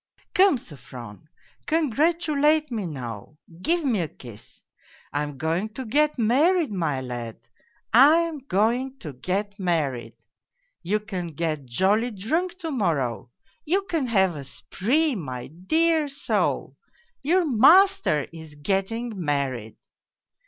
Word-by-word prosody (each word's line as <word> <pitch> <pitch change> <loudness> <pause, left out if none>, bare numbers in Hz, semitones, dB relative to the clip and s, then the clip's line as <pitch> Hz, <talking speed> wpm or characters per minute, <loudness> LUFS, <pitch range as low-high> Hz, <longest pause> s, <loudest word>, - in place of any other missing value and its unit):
' - - -35
Come, 380 -6 +5
Sofron, 130 - -11 0.4
congratulate 305 0 +2
me 215 -6 -2
now, 125 -2 -7 0.2
give 335 - +1
me 235 -7 +1
a 165 - -2
kiss! 120 -6 -14 0.5
I 145 - 0
am 145 -2 -5
going 165 +8 -1
to 260 - -5
get 300 +6 +2
married, 290 +7 +3
my 160 -9 -1
lad, 120 -3 -6 0.5
I 275 +7 +8
am 330 -3 -3
going 250 +2 0
to 155 - -8
get 200 - -3
married. 140 - -1 0.7
You 205 +4 -1
can 190 -5 -5
get 155 -3 -3
jolly 200 - +2
drunk 320 - -2
to 325 - -3
morrow, 140 - -1 0.3
you 380 +6 +1
can 325 -8 -2
have 190 -6 +2
a 145 - -6
spree, 270 - 0
my 130 - -5
dear 315 - +1
soul 280 0 -1 0.4
your 345 +5 +2
master 310 - +5
is 160 -2 -10
getting 195 +9 -2
married.' 135 -7 -2
205 Hz, 130 wpm, -25 LUFS, -, 0.7 s, I